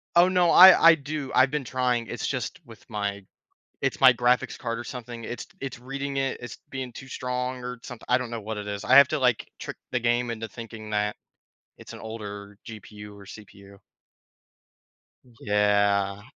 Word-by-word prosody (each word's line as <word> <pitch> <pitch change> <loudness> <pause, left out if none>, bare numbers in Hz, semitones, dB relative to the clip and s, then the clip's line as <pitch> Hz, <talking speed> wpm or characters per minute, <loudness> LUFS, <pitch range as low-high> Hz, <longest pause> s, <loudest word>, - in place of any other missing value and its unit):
Oh, 175 +1 +7
no, 180 -2 +3
I 180 -2 +9
I - - +4
do, 145 -1 -6
I've 130 +1 +5
been 150 -2 -2
trying, 125 -2 -1
it's 120 - -5
just 130 -4 -4
with 115 -3 -15
my 100 -2 -3 0.6
it's - - -1
my 130 -1 +9
graphics 125 +1 +1
card 115 -2 -4
or - - -5
something, 120 -1 -8
it's 120 +2 -6
it's 135 -2 -6
reading 140 +2 -5
it, 135 0 -1
it's 120 0 -8
being 130 -2 -5
too 130 - -11
strong 125 0 -4
or 125 0 -5
somethi 120 -1 -10
I 125 - +5
don't 125 -2 -6
know 115 -1 -5
what 110 +1 -5
it 105 0 -6
is, 100 -1 -5
I 130 - +4
have 140 - +9
to, - - -1
like, 125 -3 +1
trick - - -7
the 125 - 0
game 120 0 0
into 115 -1 -5
thinking 110 0 -10
that 105 0 0 0.6
it's - - -12
an - - -9
older 105 -2 -8
GPU 105 -2 -10
or 100 - -13
CPU. 100 -1 -14 1.6
Yeah, 100 -1 +1
120 Hz, 185 wpm, -26 LUFS, 105-130 Hz, 1.6 s, I